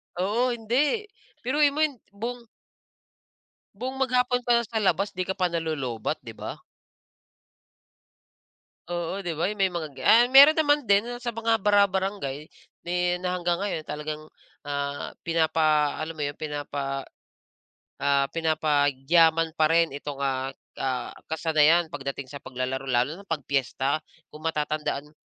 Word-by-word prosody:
Oo, 225 +7 +1
hindi 260 - +1 0.4
biruin 285 +3 +3
mo 305 - 0
hin 285 -6 -1 0.2
buong 235 +3 -5 1.3
buong 260 +5 -5
maghapon 250 -1 +2
ka 240 - +1
na 235 - +2
sa 220 0 -3
labas, 195 0 +1
'di 185 -1 -4
ka 190 - 0
pa 180 -2 0
nalolobat, 150 -9 -2
'di - - -8
ba? - - -6 2.3
Oo, 175 +2 -3
'di 175 -4 -4
ba, 175 +6 0
yung 210 - -8
may 195 - +4
mga 170 -3 -4
ga - - -7
ah, 235 +2 +7
meron 280 +4 +9
naman 295 -2 +3
din, 200 +1 +5
ah, 240 - -6
sa 240 -2 -4
mga 225 0 +1
bara 205 0 +5
barangay. 185 -7 -3 0.4
Then, 180 +1 0
hanggang 175 -1 0
ngayon 195 -6 -2
talagang, 150 +1 -6 0.3
ah, 145 0 -3 0.2
pinapa 155 -3 +2
alam 160 +1 -4
mo 150 - -3
'yon, 145 0 -4
pinapa 145 -2 -4 1.0
ah, 140 0 +2
pinapayaman 160 +1 +2
pa 155 - +5
rin 165 +1 +3
itong, 145 -1 -6
ah, 135 0 -1 0.2
ah, 130 -2 -2 0.2
kasanayan 160 +1 +3
pagdating 140 -2 -5
sa 145 - -7
paglalaro 130 0 -4
lalo 130 +6 0
na 200 - -14
'pag 160 -5 -2
piyesta. 135 +1 0 0.3
Kung 155 +1 -8
matatandaan 150 -2 -2
m - - -25
165 Hz, 145 wpm, -26 LUFS, 145-205 Hz, 2.3 s, meron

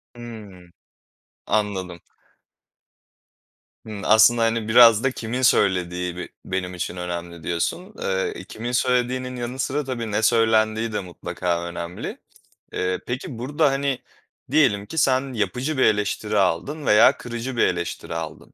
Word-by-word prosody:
Hımm. 105 -7 -11 0.8
Anladım. 95 -5 -1 1.9
Hımm. 105 -2 -7
Aslında, 110 +2 +6
hani, 115 -1 +1
biraz 115 -1 +7
da 135 - +2
kimin 120 +1 -4
söylediği 90 -6 +2
be - - -5 0.2
benim 90 -1 -3
için 90 0 -4
önemli 85 -2 -5
diyorsun. 175 - -2
Eee, 95 -1 -2
kimin 120 +2 -5
söylediğinin 125 +1 0
yanı 125 +2 -5
sıra 145 +3 -1
tabii 120 -5 -4
ne 110 - 0
söylendiği 110 -1 +2
de - - 0
mutlaka 85 0 -3
önemli. 85 0 -6 0.6
Eee, 90 0 -1
peki, 125 -1 -5
burada, 145 +3 +1
hani, 135 -1 -1 0.5
diyelim 130 -10 +3
ki 160 - -9
sen 130 -2 +2
yapıcı 125 +6 -2
bir - - +3
eleştiri 105 0 0
aldın 100 - 0
veya 110 +6 +6
kırıcı 120 +1 -5
bir - - +4
eleştiri 85 -1 -4
aldın. 80 -1 -7
110 Hz, 135 wpm, -23 LUFS, 90-125 Hz, 1.9 s, biraz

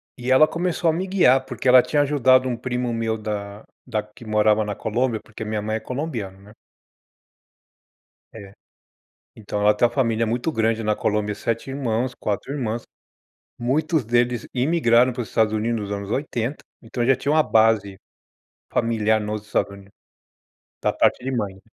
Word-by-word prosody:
E 125 +1 -3
ela 155 +4 +7
começou 170 -1 -1
a - - +2
me 185 +3 -2
guiar, 135 -9 +4
porque 130 0 -5
ela 125 0 +8
tinha 145 +2 +1
ajudado 130 -2 +3
um 120 - -1
primo 125 0 -2
meu 115 -1 -1
da 105 -1 -5 0.3
da 110 -3 -1
que 105 +2 -16
morava 105 0 +2
na 105 - -4
Colômbia, 115 0 -1
porque 110 0 -8
minha 105 -1 -2
mãe 110 +1 -2
é - - -5
colombiana, 125 -9 -5
né. 100 +2 -17 1.8
É, 100 -3 -11 0.9
então 105 -1 -4
ela 105 0 +4
tem 120 - +3
uma - - -5
família 115 -4 +1
muito 120 +8 -1
grande 115 -3 0
na 105 0 0
Colômbia, 105 -1 -1
7 115 +5 -3
irmãos, 125 -2 -2
4 105 +6 -3
irmãs, 120 -5 -3 0.8
muitos 150 +5 0
deles 120 +1 0
imigraram 125 -3 +3
para 125 - -4
os 110 - -6
Estados 110 -1 +1
Unidos 115 +1 -1
nos 100 0 -5
anos 100 0 -4
80, 130 -1 -3 0.2
então 120 +1 -3
eu 120 - 0
já 135 - +6
tinha 145 - -2
uma 155 0 +4
base 110 -3 +2 0.8
familiar 110 -2 +1
nos 105 0 -4
Estados 105 - 0
Unidos, 100 0 -14 0.9
da - - +2
parte 125 - +1
de 135 0 -2
mãe. 100 -5 -3
115 Hz, 175 wpm, -22 LUFS, 105-130 Hz, 1.8 s, ela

